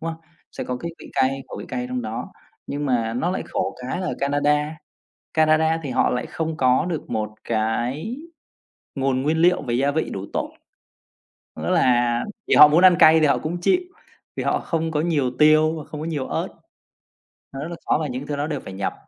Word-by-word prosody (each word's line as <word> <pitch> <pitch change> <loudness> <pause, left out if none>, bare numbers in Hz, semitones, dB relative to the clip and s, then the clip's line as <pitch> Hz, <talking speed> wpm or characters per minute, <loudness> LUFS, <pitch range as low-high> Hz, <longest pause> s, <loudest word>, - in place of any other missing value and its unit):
đúng 165 0 -3
không? 160 - -13 0.3
Sẽ - - -5
có 125 - -3
cái 170 +6 -5
vị - - -12
cay, 135 +1 +1
khẩu - - -7
vị - - -6
cay 125 -1 -3
trong 125 0 -3
đó. 110 0 -5 0.3
Nhưng 145 +1 -3
mà 115 -3 0
nó 165 +9 0
lại 185 - -2
khổ - - -3
cái 130 +8 -3
là 185 - -2
Canada 145 +2 +1 0.6
Canada 160 +1 +3
thì 140 - -4
họ - - +2
lại 125 - -2
không 160 -1 -3
có 130 +3 +3
được 165 -4 -4
một 110 -1 -2
cái 120 - -1 0.8
nguồn 135 -1 0
nguyên 155 +4 +1
liệu 175 +2 +4
về 120 -4 -3
gia 140 +3 +2
vị 160 +2 -1
đủ 95 0 -5
tốt, - - -2 1.0
nữa - - -4
là 120 -1 +3 0.3
vì - - +3
họ 150 - +10
muốn 155 +4 +3
ăn 180 - +7
cay 160 +1 +7
thì 155 - +4
họ 140 - +3
cũng 165 +3 -3
chịu, 365 - +3 0.6
vì - - -3
họ - - +1
không 165 -1 -2
có 150 -1 0
nhiều 150 -6 0
tiêu 155 +1 +5
và 155 - -6
không 150 - -8
có 155 - -4
nhiều 150 -5 -3
ớt, - - -2 1.1
nó 135 - -6
rất 145 - -4
là 170 - -5
khó - - +2
và 155 - -1
những 130 +2 -5
thứ 145 - -2
đó 145 +1 -2
đều 150 -3 -3
phải 95 - -9
nhập. 95 0 -2
145 Hz, 220 wpm, -22 LUFS, 125-160 Hz, 1.1 s, họ